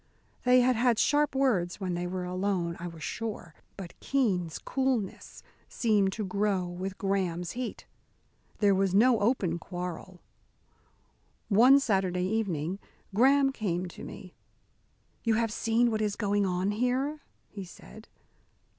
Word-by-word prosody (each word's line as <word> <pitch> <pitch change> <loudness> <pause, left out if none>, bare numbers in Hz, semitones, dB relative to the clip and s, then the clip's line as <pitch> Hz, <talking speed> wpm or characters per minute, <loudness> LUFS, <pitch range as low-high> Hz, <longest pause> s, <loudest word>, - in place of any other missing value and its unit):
They 250 0 +6
had 250 0 +3
had 240 0 +2
sharp 295 +3 +2
words 210 -11 +1
when 185 -3 -2
they 175 +1 -2
were 185 0 -3
alone, 180 -1 -1
I 175 - -5
was 165 -2 -9
sure, 210 -6 -5 0.2
but 185 -3 -9
Keene's 190 - 0
coolness 260 -7 -2 0.3
seemed 210 -5 +2
to 215 0 -3
grow 200 -1 0
with 185 +2 -5
Graham's 180 -3 -1
heat. 250 -1 -5 0.7
There 205 -2 +4
was 190 -1 +1
no 235 +2 +5
open 200 -6 +1
quarrel. 180 +1 -7 1.3
One 245 +7 +7
Saturday 190 -7 0
evening, 190 -4 -2 0.3
Graham 270 +5 +4
came 185 -8 -2
to - - -11
me. 185 - -10 0.9
"You 230 -1 +2
have 225 -1 0
seen 230 +2 +2
what 220 0 -1
is 210 -1 0
going 205 -2 +1
on 185 +2 0
here?" 255 +7 0 0.3
he 200 - -8
said. 215 +4 -13
200 Hz, 135 wpm, -29 LUFS, 180-235 Hz, 1.3 s, One